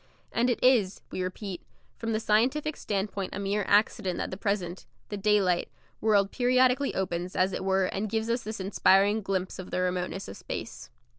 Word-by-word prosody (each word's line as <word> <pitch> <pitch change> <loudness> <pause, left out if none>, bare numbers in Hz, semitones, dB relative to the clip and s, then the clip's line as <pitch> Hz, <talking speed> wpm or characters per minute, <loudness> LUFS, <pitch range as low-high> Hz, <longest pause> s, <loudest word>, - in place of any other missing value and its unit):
And 240 +2 +2
it 245 - +1
is, 235 -7 +3
we - - -3
repeat, 185 0 -5 0.4
from 225 0 -2
the 215 - +1
scientific 255 +8 +1
standpoint 200 -1 -3
a - - -4
mere 200 +1 0
accident 200 -3 +2
that - - -3
the - - -3
present 190 -3 -2 0.2
the 205 - -3
daylight 195 -3 +2 0.3
world 205 -3 +3
periodically 255 +2 +3
opens, 180 -1 -2
as 185 +1 +2
it - - -3
were, 190 0 +2
and 200 +3 -2
gives 220 +1 -1
us 235 +1 0
this 220 0 -6
inspiring 195 +2 +3
glimpse 190 -2 -2
of 185 - -7
the - - -2
remoteness 180 +1 -2
of 100 - -8
space. - - -7
200 Hz, 180 wpm, -28 LUFS, 185-220 Hz, 0.4 s, is